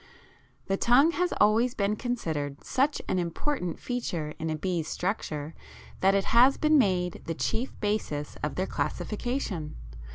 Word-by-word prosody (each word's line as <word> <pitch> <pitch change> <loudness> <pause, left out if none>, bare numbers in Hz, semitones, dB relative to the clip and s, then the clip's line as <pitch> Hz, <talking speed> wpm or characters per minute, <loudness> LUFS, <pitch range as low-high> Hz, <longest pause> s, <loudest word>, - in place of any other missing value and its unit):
The 195 - 0
tongue 265 +10 +5
has 360 +1 0
always 225 +4 +4
been 200 +1 +1
considered 160 - -3
such 275 +3 +1
an 185 - +1
important 180 - -2
feature 175 -11 -3
in 160 0 -2
a 155 - -1
bee's 170 -1 -2
structure 160 -6 -3 0.5
that 195 +1 +4
it 195 - +1
has 250 +4 +6
been 305 -1 +4
made 180 -6 +1
the 165 - -3
chief 230 - -2
basis 205 -9 -2
of 150 -2 -2
their 185 - 0
classification. 210 - -3
195 Hz, 150 wpm, -28 LUFS, 165-245 Hz, 0.5 s, has